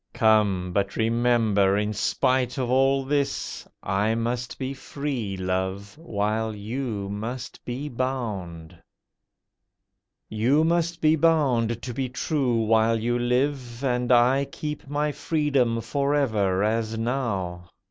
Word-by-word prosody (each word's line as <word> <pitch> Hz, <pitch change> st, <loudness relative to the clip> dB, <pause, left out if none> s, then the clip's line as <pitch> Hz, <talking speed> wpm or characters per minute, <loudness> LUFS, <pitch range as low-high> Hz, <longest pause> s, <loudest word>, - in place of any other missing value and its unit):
Come! 100 Hz, -5 st, +2 dB
but 100 Hz, 0 st, 0 dB
remember, 115 Hz, -4 st, +2 dB
in 105 Hz, +1 st, 0 dB
spite 125 Hz, +4 st, +1 dB
of 125 Hz, -2 st, -1 dB
all 135 Hz, +1 st, +3 dB
this, 140 Hz, 0 st, -2 dB, 0.2 s
I 105 Hz, +4 st, +1 dB
must 120 Hz, +1 st, -2 dB
be 135 Hz, 0 st, -3 dB
free, 135 Hz, -7 st, -4 dB
Love, 95 Hz, +2 st, -3 dB
while 110 Hz, -6 st, -2 dB
you 110 Hz, -1 st, -4 dB
must 110 Hz, +5 st, -6 dB
be 130 Hz, +4 st, -4 dB
bound. 110 Hz, -, -4 dB, 1.5 s
You 125 Hz, +8 st, +2 dB
must 170 Hz, 0 st, 0 dB
be 155 Hz, 0 st, +5 dB
bound 130 Hz, -8 st, +2 dB
to 125 Hz, -, -4 dB
be 130 Hz, +1 st, -2 dB
true 125 Hz, -3 st, 0 dB
while 110 Hz, +1 st, +3 dB
you 120 Hz, +2 st, 0 dB
live, 125 Hz, 0 st, -1 dB
And 125 Hz, -1 st, 0 dB
I 125 Hz, +3 st, +4 dB
keep 150 Hz, -1 st, -6 dB
my 150 Hz, +1 st, 0 dB
freedom 140 Hz, -7 st, +1 dB
for 140 Hz, +3 st, 0 dB
ever, 105 Hz, -9 st, +1 dB
as 110 Hz, +1 st, 0 dB
now. 100 Hz, -8 st, -2 dB
120 Hz, 125 wpm, -25 LUFS, 105-135 Hz, 1.5 s, be